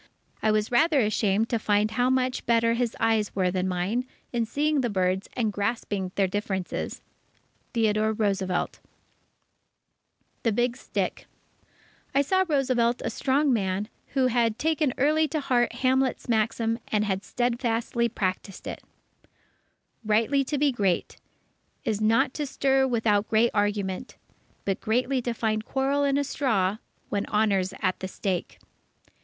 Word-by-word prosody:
I 220 - +2
was 215 +1 +1
rather 310 +4 +4
ashamed 215 -1 +2
to 230 - 0
find 210 0 +2
how 245 +3 +2
much 255 -1 0
better 230 0 +3
his 235 -1 -1
eyes 225 -2 +1
were 185 -2 +1
than 185 0 -1
mine, 190 +8 -1 0.3
in 235 -2 0
seeing 295 +3 +1
the 240 - 0
birds 185 -1 0
and 225 -4 -1
grasping 200 -2 -2
their 195 - +3
differences. 190 -1 -3 0.7
Theodore 215 -1 +2
Roosevelt 195 -4 -1 1.6
THE 230 - +1
BIG 240 +2 +1
STICK 265 - -3 0.9
I 280 - +5
saw 375 +6 +2
in 375 - 0
Roosevelt 250 -4 +1
a - - -1
strong 275 +1 +2
man, 195 -1 -1 0.3
who 265 -1 +3
had 235 -3 +2
taken 310 -1 +1
early 310 +3 +3
to 310 +2 -2
heart 245 -4 +1
Hamlet's 260 +1 0
maxim, 225 0 0
and 210 0 +1
had 195 -1 -1
steadfastly 235 -1 0
practised 190 -2 -3
it: - - -6 1.2
"_Rightly 225 +6 +2
to 295 - -1
be 285 0 +3
great 195 -7 -1 0.7
Is 215 -1 -1
not 240 +5 +3
to 295 -2 -3
stir 270 0 +2
without 220 -4 +1
great 225 +2 +3
argument, 205 +1 -1 0.5
But 195 -1 -1
greatly 250 +4 +1
to 240 0 -2
find 215 -1 0
quarrel 275 +4 0
in 280 0 +2
a 285 - +2
straw 215 -9 0 0.3
When 205 0 -1
Honour's 200 -3 +1
at 185 - +1
the 190 - -4
stake. 185 -1 -3
225 Hz, 145 wpm, -26 LUFS, 205-255 Hz, 1.6 s, I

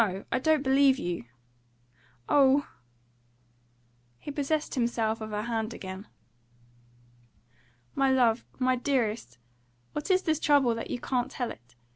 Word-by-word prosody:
I - - +2
don't 310 +1 +2
believe 270 0 +4
you." 175 - -4 1.0
"Oh!" 280 0 +4 1.5
He 290 - -7
possessed 295 +2 -1
himself 230 -3 0
of 220 - -5
her 210 0 -3
hand 230 -1 -2
again. 190 +2 -8 1.9
"My 270 0 +2
love 245 -3 +3
my 255 0 +2
dearest! 235 - -1 0.6
What 300 - -4
is 375 0 +3
this 315 -2 +1
trouble, 280 -6 +4
that 230 - -5
you 245 - -3
can't 250 0 -1
tell 245 -2 -3
it? 120 0 -15
255 Hz, 125 wpm, -28 LUFS, 220-280 Hz, 1.9 s, believe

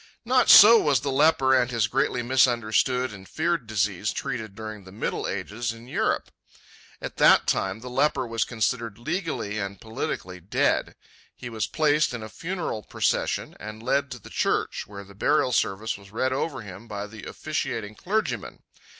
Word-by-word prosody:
Not 255 +1 +3
so 225 +2 +10
was 140 -5 +2
the 140 0 -2
leper 135 -1 +4
and 125 -2 +3
his 115 -3 +1
greatly 125 +1 0
misunderstood 125 0 +2
and 95 -1 -12
feared 165 -6 -1
disease 105 -2 0
treated 115 -6 -4
during 110 -1 -7
the 95 - -13
middle 105 - -3
ages 105 +5 -3
in 115 +1 -13
Europe. - - -1 0.7
At - - -7
that - - +6
time 95 +3 -1
the 125 - -8
leper 130 0 +1
was 115 -1 0
considered 115 -1 -2
legally 140 - -3
and 100 -1 -5
politically 95 -4 -5
dead. 90 +3 0 0.4
He 120 - -8
was 110 -3 -2
placed 150 -4 +2
in 115 - -6
a 110 - -7
funeral 170 - -4
procession - - -1
and 110 +1 -8
led 140 +2 +1
to 125 - -6
the - - -14
church, - - -1
where 100 -1 -9
the 100 0 -15
burial 130 +5 +2
service 105 -1 0
was 100 0 -15
read 130 +5 -1
over 135 -1 -2
him 100 +3 -10
by 105 -1 -5
the 110 0 -11
officiating 105 -2 -4
clergyman. 205 - -3
115 Hz, 170 wpm, -25 LUFS, 105-135 Hz, 0.7 s, so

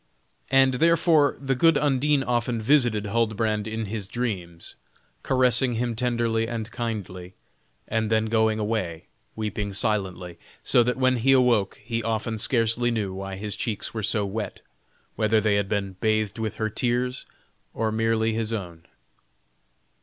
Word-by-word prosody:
And, 135 -1 +4
therefore, 160 0 +3
the 135 -1 -1
good 165 +4 +4
Undine 145 0 +2
often 120 -1 -1
visited 115 -4 +3
Huldbrand 110 0 0
in 110 0 -3
his 105 -1 -4
dreams; 95 -8 -4 0.5
caressing 130 -1 +2
him 120 0 -2
tenderly 115 -2 0
and 115 -2 -5
kindly, 95 -6 -5 0.5
and 110 -1 -1
then 110 0 +2
going 110 -1 +2
away, 105 -7 -2 0.3
weeping 105 -2 -3
silently, 95 -5 -2 0.2
so 120 - +4
that 125 +1 0
when 130 -1 +2
he 135 +4 +3
awoke 120 -7 +2
he 115 0 -2
often 110 0 -2
scarcely 115 +1 +2
knew 105 -5 -2
why 95 0 -6
his 105 +1 -5
cheeks 115 -6 -3
were 110 - -3
so 105 0 0
wet; 105 +2 -5 0.5
whether 110 0 +3
they 105 -1 +1
had 100 -1 0
been 100 -3 -2
bathed 110 -1 0
with 110 -1 -3
her 110 -1 -2
tears, 125 +3 -1 0.5
or 110 -1 0
merely 110 0 +1
with 110 - -3
his 115 0 -2
own? 85 -6 -6
110 Hz, 150 wpm, -25 LUFS, 105-120 Hz, 0.5 s, And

